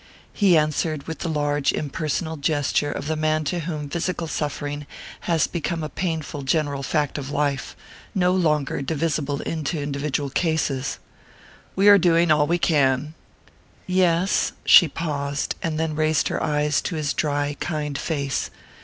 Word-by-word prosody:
He 190 -5 +4
answered 155 0 0
with 160 -1 -6
the 170 - -3
large 145 -2 +1
impersonal 155 +2 -2
gesture 145 -1 0
of - - -5
the 160 +1 -1
man 155 0 +1
to 175 +4 -2
whom 155 -3 -4
physical 170 +2 -2
suffering 145 -1 -3 0.4
has 165 -2 +3
become 170 -1 -3
a 155 - -3
painful 160 -5 -3
general 140 0 0
fact 150 +1 -1
of 140 -1 -6
life, 145 -3 -1 0.4
no 180 -2 +3
longer 150 -7 +1
divisible 145 0 -1
into 160 0 -3
individual 145 0 -2
cases. 150 -5 0 0.8
"We 195 +2 +3
are 205 -1 +9
doing 170 -1 +4
all 150 -1 +4
we 170 +2 +2
can." 145 -3 +2 0.7
"Yes." 185 0 +2
She 175 - +8
paused, 140 -3 -2
and 160 -2 -2
then 160 -1 -1
raised 155 -1 +1
her - - -2
eyes 150 -1 +1
to 175 - -3
his 150 -2 -1
dry 145 -1 -1
kind 150 -4 -3
face. 140 -3 -2
150 Hz, 150 wpm, -23 LUFS, 145-165 Hz, 0.8 s, are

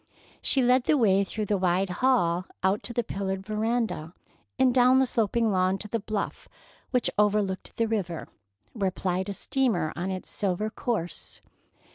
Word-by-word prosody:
She 265 - +3
led 250 +1 +4
the 305 - +3
way 200 -5 +4
through 215 +2 -3
the 205 -1 0
wide 185 +1 +1
hall, 180 -9 +3 0.2
out 190 +2 +2
to - - -4
the 240 0 0
pillared 190 -1 -3
veranda, 215 -6 -1 0.4
and 260 -1 +4
down 255 +1 +5
the 265 - +4
sloping 230 -1 +1
lawn 185 0 +2
to 210 - -6
the 230 +2 -2
bluff 210 -1 -4 0.4
which 250 -3 +1
overlooked 205 -2 0
the 230 - +2
river, 185 -7 -2 0.5
where 200 -5 0
plied 185 +1 -2
a - - -2
steamer 220 - 0
on 180 +2 -3
its 185 -1 -5
silver 205 +2 -1
course. 215 - -4
205 Hz, 165 wpm, -27 LUFS, 185-235 Hz, 0.5 s, down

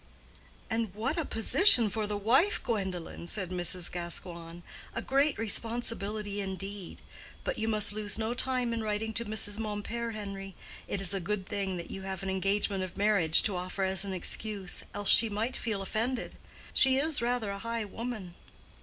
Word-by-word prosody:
"And 225 -4 -2
what 250 +8 -1
a 330 - -1
position 235 - +7
for 210 +1 -2
the 205 0 -2
wife, 260 - +3
Gwendolen!" 190 -6 -3
said 185 -1 -2
Mrs. 175 0 +1
Gascoigne; 170 -1 -5 0.3
"a - - -1
great 275 +2 +2
responsibility 215 -2 -1
indeed. 195 0 -6 0.4
But - - -3
you 220 - -1
must 215 -2 +3
lose 210 -1 -3
no 225 +1 -1
time 250 -1 0
in 230 - -2
writing 220 +1 -2
to 235 +1 0
Mrs. 210 -1 0
Mompert, 225 +2 -3
Henry. 195 -2 -7 0.3
It 195 - -2
is 195 0 +2
a 195 - -1
good 195 +1 -2
thing 195 -2 -3
that 170 - -7
you 195 - -6
have 190 0 -5
an 190 - -2
engagement 195 0 +1
of 185 0 -7
marriage 200 -6 +4
to 205 - +1
offer 185 +2 -3
as 190 0 0
an 200 - -5
excuse, 195 +1 -2
else 205 -1 +1
she 225 - +7
might 220 +5 -2
feel 210 -4 -2
offended. 230 +6 -2 0.4
She 265 0 +6
is 300 0 +1
rather 235 -3 0
a 200 - -5
high 230 0 -3
woman." 215 -4 -6
205 Hz, 175 wpm, -30 LUFS, 190-230 Hz, 0.4 s, position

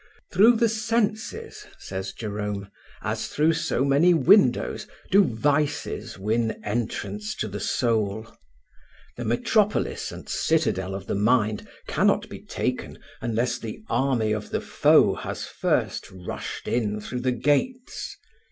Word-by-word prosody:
"Through 215 +6 +6
the 230 +1 +3
senses," 220 0 -2
says 95 0 -5
Jerome, 105 -2 -4 0.3
"as - - -2
through 155 +2 +2
so 160 -5 0
many 150 +6 +5
windows, 165 - +4 0.2
do 200 +1 +7
vices 145 - -1
win 110 +3 0
entrance 120 - -3
to 110 - -2
the 105 0 -5
soul. 110 -1 -1 0.8
The 120 - -5
metropolis 205 - +1
and - - -10
citadel 105 - 0
of 95 -1 -6
the - - -2
mind 105 0 +2 0.2
cannot - - +2
be - - -8
taken - - -3 0.2
unless 120 +1 0
the 115 - -7
army 120 -4 +1
of 105 -1 -2
the - - -1
foe - - +4
has - - -5
first - - -1
rushed 95 -1 -6
in 105 -3 0
through 125 +4 -5
the 130 0 +1
gates. 145 - -1
120 Hz, 130 wpm, -25 LUFS, 105-165 Hz, 0.8 s, do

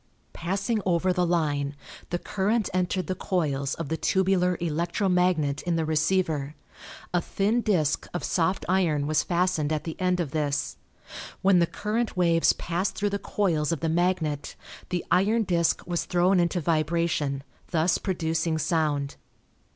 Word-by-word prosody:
Passing 195 +5 -1
over 180 0 +2
the 180 -1 +1
line 145 -4 0 0.3
the 175 - -1
current 205 +4 -1
entered 185 0 0
the 185 - -2
coils 145 -7 -1
of 165 -4 -5
the 160 - -1
tubular 185 -1 +2
electro 170 +4 -1
magnet 180 -6 +2
in 175 -1 -1
the 165 -1 0
receiver. 155 -2 0 0.6
A 175 - +2
thin 210 +7 0
disk 170 -10 +1
of 175 - -4
soft 180 +2 0
iron 170 -6 +2
was 155 0 +2
fastened 175 -4 0
at 155 -1 -1
the 160 - -5
end 180 0 +1
of 160 -6 -2
this. 145 -2 -1 0.7
When 190 -2 +5
the 170 - +3
current 215 +2 -2
waves 170 -2 +4
passed 175 +3 -2
through 205 -1 -1
the 200 - -1
coils 170 -7 0
of 165 - -2
the 165 - 0
magnet 165 -4 0 0.3
the 180 -1 -2
iron 210 +5 +3
disk 170 -4 +1
was 175 -1 -2
thrown 180 +2 +3
into 175 +1 +1
vibration, 155 -3 0 0.3
thus 165 +1 +2
producing 165 -3 -1
sound. 150 -3 0
170 Hz, 155 wpm, -26 LUFS, 155-185 Hz, 0.7 s, When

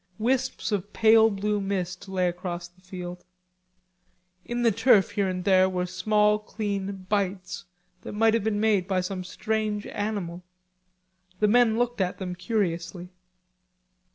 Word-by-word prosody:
Wisps 255 +1 0
of 205 0 -2
pale 225 0 +6
blue 205 0 -1
mist 195 0 -3
lay 185 -1 +1
across 175 0 -4
the 175 +1 -28
field. 180 -1 -8 1.2
In 240 0 -3
the 230 - +5
turf 225 -2 +4
here 200 -2 0
and 180 -1 -3
there 190 -1 +4
were 180 -1 -1
small 210 +3 +2
clean 200 -3 -4
bites, 190 -2 -2 0.4
that - - -8
might 225 +1 +3
have 230 -3 +1
been 210 -1 0
made 210 -4 +2
by 185 -1 +1
some 185 0 -4
strange 215 +2 -2
animal. 200 -5 -4 1.0
The 210 - +4
men 230 0 +4
looked 240 -2 0
at 180 -1 -1
them 185 -2 -4
curiously. 180 -2 -2
200 Hz, 145 wpm, -26 LUFS, 180-215 Hz, 1.2 s, pale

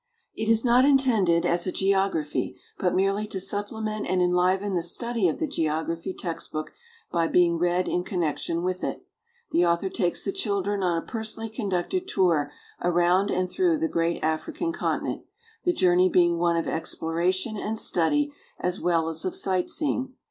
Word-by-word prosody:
It 220 0 -3
is 225 +2 +3
not 245 +1 +5
intended 235 -12 +3
as 175 +2 +1
a - - 0
geography, 190 -6 0 0.2
but 180 -1 +1
merely 195 +3 +1
to 195 - -4
supple 205 +3 -3
ment 215 -1 -3
and 185 - +1
enliven 180 +3 +2
the 175 - +1
study 225 +4 -1
of 160 - -1
the - - 0
geography 165 - -2
text 170 -2 -5
book 155 0 -3
^ - - -31 0.4
by 165 -1 +2
being 170 -1 +3
read 175 +1 +1
in 180 - 0
connection 170 -1 -2
with 185 0 -2
it. - - -4 0.5
The 175 - +3
author 170 +2 +2
takes 180 -4 -1
the 195 - 0
children 200 0 -1
on 175 -2 +1
a 165 - -4
personally 225 0 -5
conducted 220 - -2
tour 165 - +2 0.3
around 175 +3 +3
and 185 -1 0
through 345 - +2
the 325 +1 0
great 170 - -1
African 310 - -1
continent, - - -2 0.4
the 355 - +4
journey 185 - +4
being 175 -2 +3
one 170 -1 +2
of 165 - -1
exploration 175 +6 -1
and 215 +2 -3
study 290 - +1 0.3
as 180 +2 -2
well 165 -2 +2
as 160 0 -4
of 185 - -2
sight 185 -2 -1
seeing. 265 -4 -2
185 Hz, 175 wpm, -26 LUFS, 170-215 Hz, 0.5 s, not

